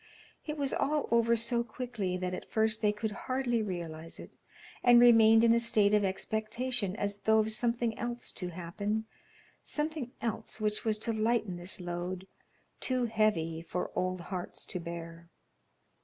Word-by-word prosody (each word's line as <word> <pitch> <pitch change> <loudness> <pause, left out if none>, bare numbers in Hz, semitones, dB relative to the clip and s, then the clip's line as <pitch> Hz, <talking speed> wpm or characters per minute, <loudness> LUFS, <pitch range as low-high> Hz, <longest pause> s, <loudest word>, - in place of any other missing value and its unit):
It 300 0 -3
was 280 -2 0
all 300 +1 0
over 235 0 +4
so 235 +1 +1
quickly 220 -6 -3
that 180 0 -3
at - - -6
first 220 0 +1
they 210 -1 +4
could 210 +1 -3
hardly 245 +1 -1
realize 165 -5 -5
it, - - -11 0.5
and 240 -1 +8
remained 225 -2 +7
in 230 0 +6
a 235 - +4
state 215 -3 +3
of 210 -1 +4
expectation 220 +2 -1
as 205 -1 -2
though 220 +1 +3
of 220 0 +2
something 235 0 0
else 240 0 -3
to 180 - -4
happen 195 +5 -3 0.6
something 300 -4 -2
else 225 -1 -3
which 210 -1 0
was 220 -1 +1
to 225 +1 -1
lighten 220 -4 0
this 175 +3 -4
load, 180 +1 -4 0.5
too 255 -1 0
heavy 210 -8 +1
for 180 +1 -4
old 185 -1 -1
hearts 180 0 -5
to 180 - -5
bear. 170 0 -8
220 Hz, 160 wpm, -31 LUFS, 185-235 Hz, 0.6 s, and